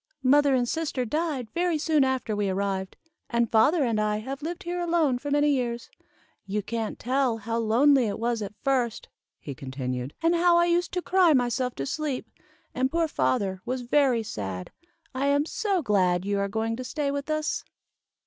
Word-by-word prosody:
"Mother 280 +1 +5
and 245 -1 +1
sister 290 -4 -2
died 290 -3 -2
very 345 -1 0
soon 305 -1 +2
after 260 -5 -1
we 205 -1 0
arrived, 190 0 -2 0.3
and 235 -1 +1
father 275 +8 +4
and 225 -4 +1
I 210 0 0
have 270 +6 -6
lived 345 +6 -5
here 355 0 -3
alone 330 -7 +1
for 290 - -5
many 290 +1 +3
years. 240 -3 -2 0.6
"You 205 +1 -2
can't 225 +1 -3
tell 255 -1 0
how 225 +2 -3
lonely 245 +3 +4
it 205 - -3
was 230 0 -1
at 205 0 -6
first," 255 -5 0 0.3
he 140 - -7
continued, 130 0 -5
"and 335 +1 +4
how 345 0 +4
I 345 - +4
used 345 +1 +1
to 360 -1 -2
cry 360 -3 +4
myself 250 -1 0
to 135 - -3
sleep, 290 - -3 0.5
and 260 +1 +1
poor 330 +2 +1
father 190 - 0
was 255 +1 -3
very 250 -2 +2
sad. 95 - -5 0.4
I 265 +2 -1
am 285 +1 +2
so 390 -1 -1
glad 185 -5 +2
you 200 0 0
are 200 - 0
going 225 +2 -1
to 255 - -5
stay 285 +2 -2
with 280 +1 -4
us." 310 0 -1
255 Hz, 185 wpm, -26 LUFS, 215-295 Hz, 0.6 s, Mother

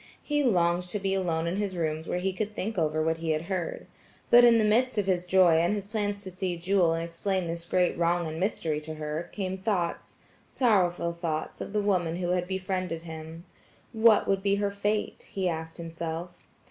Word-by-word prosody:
He 295 -1 +1
longed 180 -6 +2
to 210 - 0
be 195 -1 -1
alone 170 -4 0
in 170 +3 -1
his 200 -3 -2
rooms 160 -1 -2
where - - -1
he 190 +1 -1
could 210 +2 -4
think 220 +4 -3
over 155 -3 +1
what 160 0 +1
he 165 0 -4
had 155 0 0
heard. 180 -2 -3 0.5
But 240 0 +9
in 235 -1 +7
the 220 - +3
midst 235 +3 +2
of 205 - +2
his 180 -2 0
joy 180 -3 +5
and 170 +5 +2
his 200 -2 -4
plans 205 -1 -2
to 190 - -7
see 185 -1 -3
Jewel 175 -1 +2
and 165 - -2
explain 180 +2 -2
this 170 0 -4
great 180 +1 +1
wrong 170 0 +1
and 160 0 -5
mystery 165 -6 -1
to 155 +1 -6
her, 155 +2 -4
came 190 -2 -3
thoughts–sorrowful 185 0 -1
thoughts 165 -2 -4
of - - -5
the 210 0 0
woman 180 -5 +1
who 175 0 -2
had 180 0 0
befriended 185 -3 -3
him. 160 +1 -9 0.5
What 220 -1 +5
would 195 -1 +1
be 200 0 +2
her 200 0 0
fate? 205 +1 -2
he 190 -2 0
asked 160 -1 -4
himself. 165 +1 -6
180 Hz, 205 wpm, -28 LUFS, 165-200 Hz, 0.5 s, But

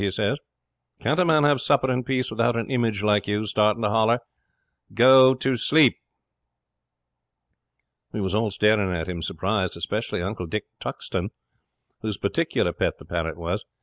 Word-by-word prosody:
he 100 - +1
says. - - -1 0.6
"Can't 150 +5 0
a 180 - +4
man 155 -3 +3
have 145 -3 +3
supper 130 +1 +2
in 125 0 -1
peace 130 -1 -2
without 115 +2 +1
an 115 +3 -3
image 115 -5 0
like 105 -1 +2
you 105 +1 -1
starting 105 +1 +1
to 105 - +2
holler? 115 +2 +3 0.8
Go 130 +2 +7
to 130 0 -1
sleep." 140 +2 +4 2.2
'We 105 - -4
was 95 -1 -2
all 110 +1 +1
staring 105 -1 +2
at 80 -3 -3
him 90 -2 -5
surprised, 95 +2 -2
especially 85 - -3
Uncle 90 -2 -4
Dick 105 +4 -4
Tuxton, - - -4 0.7
whose 110 -3 -3
particular - - -1
pet - - -2
the - - -15
parrot 85 -1 -3
was. 85 +4 -3
110 Hz, 160 wpm, -24 LUFS, 100-125 Hz, 2.2 s, Go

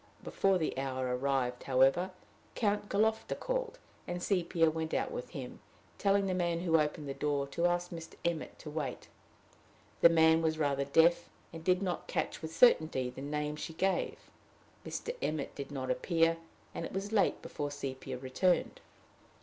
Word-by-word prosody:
Before 195 -1 +2
the 160 - -1
hour 130 -2 -1
arrived, 125 -2 0
however, 135 +8 +3 0.5
Count 205 -2 0
Galofta 220 +2 +1
called, - - -2 0.3
and 175 0 -4
Sepia 170 -4 +2
went 160 0 -3
out - - 0
with - - -5
him, - - -7 0.4
telling 200 0 +3
the 190 - 0
man 175 -2 0
who 165 -2 +3
opened 150 0 -1
the 135 - -3
door 145 -1 0
to 170 +5 +1
ask 175 0 -1
Mr. 165 -1 -8
Emmet 170 -2 -2
to 150 - -9
wait. 150 -5 -4 0.9
The 170 - +8
man 160 0 +5
was 160 -1 +1
rather 140 -2 +1
deaf, 165 +4 +4 0.2
and 165 -1 -8
did 185 +2 +2
not 180 -2 -3
catch - - -2
with 160 -1 -5
certainty 155 - +4
the 130 - -9
name 150 +1 -2
she 160 - -6
gave. 190 +4 0 0.7
Mr. 480 - -4
Emmet 155 -2 -2
did 140 -1 -6
not 130 -2 -2
appear, 165 +4 +2 0.4
and - - -4
it - - -6
was 195 +2 -3
late 210 -3 +2
before 145 -1 -4
Sepia 135 -2 -5
returned. 175 - 0
160 Hz, 165 wpm, -32 LUFS, 140-185 Hz, 0.9 s, The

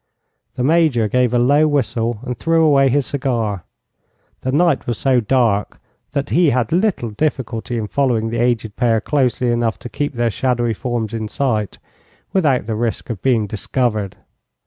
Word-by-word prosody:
The 125 - -2
Major 150 -6 +3
gave 125 +1 +1
a 125 - +2
low 145 +6 +4
whistle 120 -6 -1
and 125 -1 -3
threw 165 +6 +2
away 135 -3 +4
his 140 +1 +1
cigar. 115 - -2 0.8
The 130 - -2
night 160 0 +2
was 120 -3 -1
so 130 -2 +2
dark 115 -4 +1 0.3
that 140 -2 -2
he 170 -2 +4
had 125 -3 0
little 175 - 0
difficulty 120 -2 -2
in 110 - -2
following 115 -2 0
the 115 - -2
aged 115 -3 0
pair 115 -3 +2
closely 125 0 0
enough 120 -1 0
to 120 - -9
keep 145 +3 -3
their 120 -1 0
shadowy 120 -1 0
forms 115 -1 -3
in 110 -1 -3
sight, 110 - -1 0.6
without 145 - +2
the 110 - -3
risk 115 +2 -2
of 105 - -6
being 120 -5 +2
discovered. 110 -1 -2
120 Hz, 170 wpm, -19 LUFS, 115-140 Hz, 0.8 s, low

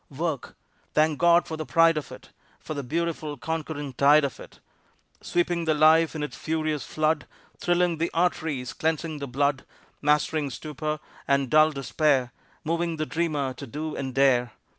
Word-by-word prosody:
Work! 150 -1 -4 0.4
Thank 155 -1 +3
God 170 0 +5
for 160 - -5
the 155 - -4
pride 165 0 +5
of 150 - -4
it, - - -12 0.3
For - - -6
the 145 - -3
beautiful, 155 +1 -3
conquering 155 -2 -4
tide 145 +4 +5
of 135 - -5
it. - - -13 0.6
Sweeping 175 -1 0
the 155 -1 +2
life 160 +2 +5
in 150 - -3
its 145 -4 -5
furious 155 -2 -2
flood, 155 0 0 0.3
Thrilling 175 -2 +1
the 170 - 0
arteries, 160 -7 -1
cleansing 160 -1 -2
the 140 - -5
blood, 140 +1 0 0.4
Mastering 150 0 +1
stupor 150 +3 -4 0.3
and 140 -2 +1
dull 155 0 +6
despair, 135 -2 +1 0.3
Moving 165 +1 -1
the 155 - -1
dreamer 150 -5 -1
to 140 +2 -9
do 150 +5 -5
and 130 -2 -4
dare. 125 -4 +3
155 Hz, 160 wpm, -26 LUFS, 140-160 Hz, 0.6 s, dull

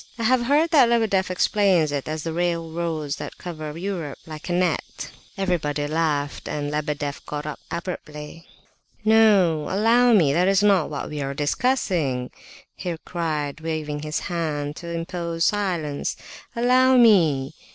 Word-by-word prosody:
"I 230 - -4
have 245 +1 +3
heard 300 +4 +3
that 275 -7 +6
Lebedeff 215 -6 +2
explains 185 -4 +2
it 140 -2 -3
as 155 0 -4
the 165 - -3
railroads 165 -3 -2
that - - -7
cover 155 -3 -7
Europe 170 -6 -4
like 155 +2 -8
a - - -1
net." 180 +1 -1 0.3
Everybody 155 -6 -1
laughed, 150 -2 -1
and 145 -1 -3
Lebedeff 150 -1 -3
got 150 0 -4
up 150 - -5
abruptly. 165 -2 -7 0.6
"No! 205 -8 +4
Allow 230 +5 +4
me, 160 -10 +4
that 175 +4 +3
is 195 +1 +3
not 195 -6 +3
what 145 -2 -4
we 150 -1 -4
are 140 0 -3
discussing!" 150 - 0 0.4
he 175 -3 -4
cried, 155 -4 -3
waving 155 -2 -3
his 155 +1 -3
hand 150 -4 -3
to 170 - -8
impose 170 0 -2
silence. 175 -8 -1 0.4
"Allow 255 +2 +4
me! 160 - +4
165 Hz, 145 wpm, -23 LUFS, 150-195 Hz, 0.6 s, that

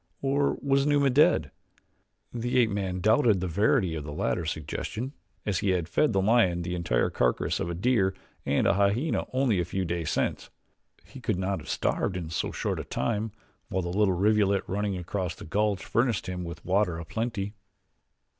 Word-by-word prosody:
Or 140 +1 +1
was 140 0 +2
Numa 145 -2 +3
dead? 80 - +4 0.8
The 120 +1 -1
ape 115 -3 +4
man 95 -2 -2
doubted 110 0 +4
the 95 - -2
verity 95 -1 +2
of 80 -2 -4
the 75 - -6
latter 85 0 -1
suggestion 110 - -4 0.3
as 100 -3 0
he 100 - 0
had 85 -2 -4
fed 145 - +2
the 95 -2 +1
lion 95 -6 +3
the 90 +1 -3
entire 85 -9 0
carcasses 60 -1 0
of 85 - -2
a 85 - -3
deer 95 -1 +2 0.3
and - - +1
a - - +4
hyena 100 +10 +1
only 130 -7 +2
a - - +2
few 95 +2 -2
days 85 -2 -2
since - - -1 0.6
he - - -12
could - - 0
not 95 0 -1
have 75 - -11
starved 95 - 0
in 85 -3 -5
so 80 - -2
short - - -2
a - - -3
time, 110 -1 -2 0.4
while 95 0 -1
the 85 - -3
little 95 0 +2
rivulet 100 0 +3
running 100 0 -2
across 90 0 -3
the - - -10
gulch 100 +2 0
furnished 120 -3 +1
him 90 -1 -4
with 85 -1 -8
water 95 -2 +1
a 85 - -6
plenty. 110 -1 -3
95 Hz, 190 wpm, -27 LUFS, 90-110 Hz, 0.8 s, dead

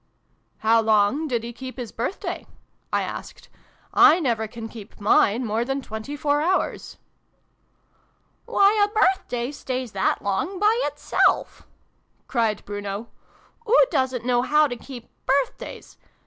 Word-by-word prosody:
" - - -44
How 225 +1 +5
long 220 +8 +2
did 240 -5 -1
he 235 0 -6
keep 260 +2 -8
his 245 -4 -6
birthday? 245 - -4 0.2
" - - -44
I - - +1
asked. - - -8 0.3
<: - - -34
I 330 - +7
never 230 -8 0
can 225 0 -8
keep 220 -2 -12
mine 215 +3 +3
more 220 +1 0
than 270 +2 -2
twenty 220 +7 -6
four 290 0 +1
hours." 365 +4 -1 0.7
" - - -42
Why, 410 +1 +4
a - - +3
birthday 370 - +1
stays 255 -4 -4
that 195 -2 0
long 260 - -1
by 420 +3 +4
itself! - - 0 0.3
" - - -43
cried 225 -4 0
Bruno. 205 +2 -5 0.6
"Oo - - +6
doosn't 260 -5 0
know 245 -1 +2
how 300 +4 +4
to 255 -4 -3
keep 245 -1 -10 0.2
birthdays! 280 - -2
245 Hz, 150 wpm, -24 LUFS, 220-290 Hz, 0.7 s, I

